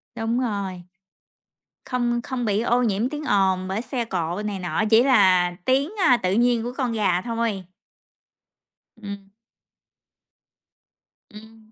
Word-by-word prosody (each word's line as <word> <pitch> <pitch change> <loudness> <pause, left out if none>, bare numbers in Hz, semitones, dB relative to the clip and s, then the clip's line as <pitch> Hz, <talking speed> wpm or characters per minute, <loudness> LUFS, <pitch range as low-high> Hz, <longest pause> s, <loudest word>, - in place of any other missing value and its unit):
Đúng 230 +1 -1
rồi. 200 -7 -3 1.0
Không 240 -1 -1
không 250 -1 -4
bị 210 -1 +1
ô 240 +1 +1
nhiễm 220 +1 0
tiếng 300 +2 -6
ồn 190 -6 +1
bởi 195 +4 -2
xe 250 -1 -3
cộ 180 -2 -3
này 210 -2 -3
nọ, 180 +2 -1
chỉ 225 +1 +6
là 190 -9 +4
tiếng, 275 +4 +1 0.2
a, 250 - +6
tự 185 -5 -1
nhiên 235 +2 +2
của 240 +2 -4
con 255 -4 -1
gà 200 -5 +1
thôi. 230 -4 -2 1.3
Ừm. 200 -2 -9 2.0
Ừm. 220 +1 -15
220 Hz, 135 wpm, -23 LUFS, 195-240 Hz, 2.0 s, chỉ